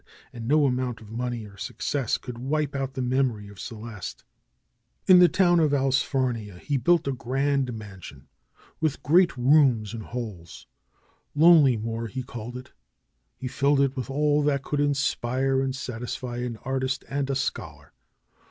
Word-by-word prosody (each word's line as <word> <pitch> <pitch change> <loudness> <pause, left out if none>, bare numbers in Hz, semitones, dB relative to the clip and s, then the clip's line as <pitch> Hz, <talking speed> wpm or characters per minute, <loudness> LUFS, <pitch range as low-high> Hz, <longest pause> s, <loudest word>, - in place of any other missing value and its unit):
And 115 -1 -7
no 150 +2 +4
amount 125 -3 -1
of 110 -2 -14
money 120 -1 -3
or 100 -1 -14
success 130 +4 -2
could 125 -3 -8
wipe 145 +2 -1
out 135 -1 -3
the 130 - -2
memory 125 -5 0
of 100 -2 -14
Celeste. 110 -3 -7 0.8
In 185 -1 +8
the 180 -1 +7
town 175 -3 +3
of 150 -3 +3
Allsfarnia 130 -6 0
he 145 +10 -3
built 160 +5 +2
a - - +1
grand 135 +1 0
mansion 95 - -10 0.5
with 155 -3 -1
great 170 0 +4
rooms 125 -5 +3
and 115 - -5
halls. 105 -8 -7 0.7
Lonelymoor 125 -9 +4
he 130 +6 -5
called 120 0 -7
it. 125 +1 -11 0.6
He 130 - -6
filled 140 +2 +2
it 140 -1 +2
with 130 0 -4
all 150 +1 +2
that 140 -2 +1
could 145 - -2
inspire 135 -2 +1
and 135 -1 -2
satisfy 125 -1 -5
an 120 -2 -4
artist 130 0 -2
and 140 0 -2
a 135 - 0
scholar. 130 - -4
130 Hz, 155 wpm, -26 LUFS, 115-140 Hz, 0.8 s, In